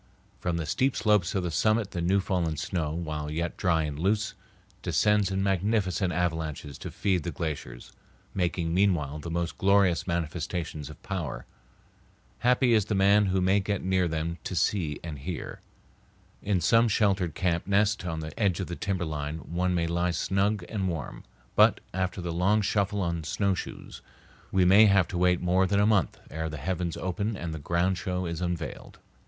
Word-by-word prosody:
From 85 -1 -1
the 80 - -2
steep 130 - +1
slopes 105 -5 +2
of 95 - 0
the 90 - -2
summit 110 +4 +1
the 85 - -3
new 95 +4 +2
fallen 90 -5 -1
snow, 80 -1 -2
while 80 -2 -4
yet 85 +3 -2
dry 85 -4 +1
and 75 -1 -4
loose, 105 +5 +1 0.5
descends 105 -2 +2
in 95 0 -1
magnificent 95 -1 +1
avalanches 80 -4 -2
to - - -6
feed 95 -3 0
the 85 - -4
glaciers, 75 -8 -5 0.4
making 85 -2 -1
meanwhile 85 -6 +1
the 85 - -6
most 85 0 -3
glorious 100 -3 +3
manifestations 80 -2 -3
of 75 - -11
power. 75 -11 -4 0.9
Happy 125 0 +3
is 110 -3 +3
the 105 - -1
man 100 +1 +4
who 95 0 +1
may 95 +2 +3
get 100 0 -2
near 95 -1 +2
them 80 +1 -3
to 95 - -4
see 80 -3 0
and 80 -4 -6
hear. 85 +4 -6 0.8
In 100 -3 0
some 115 +8 +4
sheltered 100 -6 +1
camp 85 -1 0
nest 100 0 +2
on 80 -3 -3
the 80 0 -6
edge 100 -5 +2
of 95 - -2
the 85 - -5
timberline 80 -6 -3 0.2
one 90 +1 +1
may 85 -1 +1
lie 85 +2 0
snug 95 +3 0
and 100 -4 -2
warm, 80 -7 -5 0.3
but - - +5
after 95 +1 -2
the 85 -1 -3
long 100 +5 +2
shuffle 100 0 0
on 85 -2 -2
snowshoes 95 +4 -3 0.5
we 95 -1 +3
may 100 +4 +7
have 100 -3 +4
to 90 - -3
wait 90 -1 +3
more 90 +1 +2
than 100 +1 +2
a 100 - +4
month 105 -4 +2
ere 80 +1 -3
the 75 - -6
heavens 85 +3 -2
open 100 +3 -2
and 85 -3 -4
the 80 - -5
grand 85 +4 0
show 90 +1 -2
is 85 0 -4
unveiled. 90 -1 -4
90 Hz, 180 wpm, -28 LUFS, 80-100 Hz, 0.9 s, may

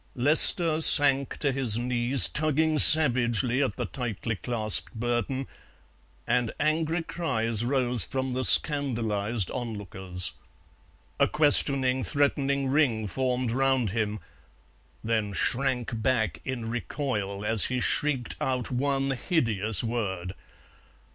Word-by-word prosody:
Lester 155 +4 +5
sank 140 -3 +6
to 140 - -2
his 130 -5 +1
knees, 125 +2 +5
tugging 155 +1 -2
savagely 125 -4 +7
at 130 -7 -3
the - - -6
tightly 115 -3 -7
clasped 110 0 0
burden, 120 +3 -5 0.8
and 120 -3 -2
angry 160 +2 -3
cries 115 -11 -3
rose 125 -3 -1
from 130 -1 -6
the 130 +1 -4
scandalized 115 - +1
onlookers. 95 -6 -7 0.9
A - - +2
questioning, 135 -3 +1
threatening 140 -2 -2
ring 130 -6 -1
formed 125 +2 -4
round 130 -4 -2
him, 105 -1 -5 0.8
then 110 -3 -4
shrank 125 0 -3
back 110 - -3
in 125 -4 -7
recoil 110 -4 -6
as 110 -1 -1
he 125 -1 -4
shrieked 130 -1 -3
out 130 -1 -4
one 135 +1 -3
hideous 115 - -3
word. 95 -6 -6
125 Hz, 110 wpm, -24 LUFS, 110-140 Hz, 0.9 s, savagely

